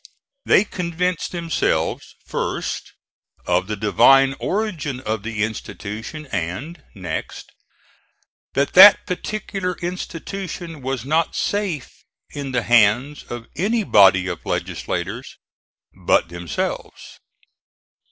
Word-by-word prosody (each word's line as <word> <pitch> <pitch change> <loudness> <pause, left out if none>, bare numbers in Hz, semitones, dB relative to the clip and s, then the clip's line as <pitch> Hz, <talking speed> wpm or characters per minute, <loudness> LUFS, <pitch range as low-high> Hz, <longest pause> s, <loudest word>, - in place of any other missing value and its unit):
They - - +6
convinced 180 -2 -2
themselves, 170 -2 -1
first, - - -3 0.5
of 90 +1 +1
the 105 - -2
divine 135 +6 +5
origin 180 - -2
of 110 -3 -2
the 110 -1 -2
institution 110 +6 -6
and, 95 - -4
next, 90 -5 -6 1.0
that 140 0 0
that 195 +2 +9
particular 185 -1 -3
institution 175 -2 -6
was 130 -2 -3
not 160 +4 +1
safe 195 -9 -2 0.3
in 140 -2 -5
the 125 -2 0
hands 120 +5 +3
of 120 -1 -6
any 215 +6 +1
body 95 - +5
of 90 -3 -5
legislators 100 +9 -4 0.6
but 85 - +1
themselves. 85 0 -5
135 Hz, 100 wpm, -21 LUFS, 105-175 Hz, 1.0 s, that